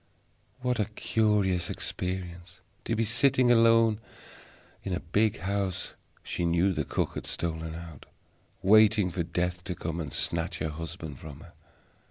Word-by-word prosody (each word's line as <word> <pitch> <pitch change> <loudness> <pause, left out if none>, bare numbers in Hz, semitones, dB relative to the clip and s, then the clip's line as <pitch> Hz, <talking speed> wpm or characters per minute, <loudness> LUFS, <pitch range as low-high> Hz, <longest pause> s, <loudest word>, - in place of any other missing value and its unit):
What 125 -1 0
a 105 - +2
curious 105 -4 +1
experience: 90 -1 -4 0.3
to 115 - 0
be 115 +1 +1
sitting 130 +2 +4
alone 115 -2 +5 0.8
in 95 - -3
a 90 - -1
big 100 +5 0
house 95 -1 -2 0.3
she - - -3
knew 85 +3 +2
that - - -2
the - - -17
cook - - 0
had - - -5
stolen 80 -1 -2
out 85 -4 -10 0.6
waiting 105 -1 +5
for 85 - -2
Death 90 +1 -2
to 90 -3 -3
come 80 +1 -4
and 75 -4 -4
snatch 85 0 -1
her 80 - -2
husband 80 -2 -7
from 75 -3 -10
her. - - -14
90 Hz, 155 wpm, -28 LUFS, 85-105 Hz, 0.8 s, alone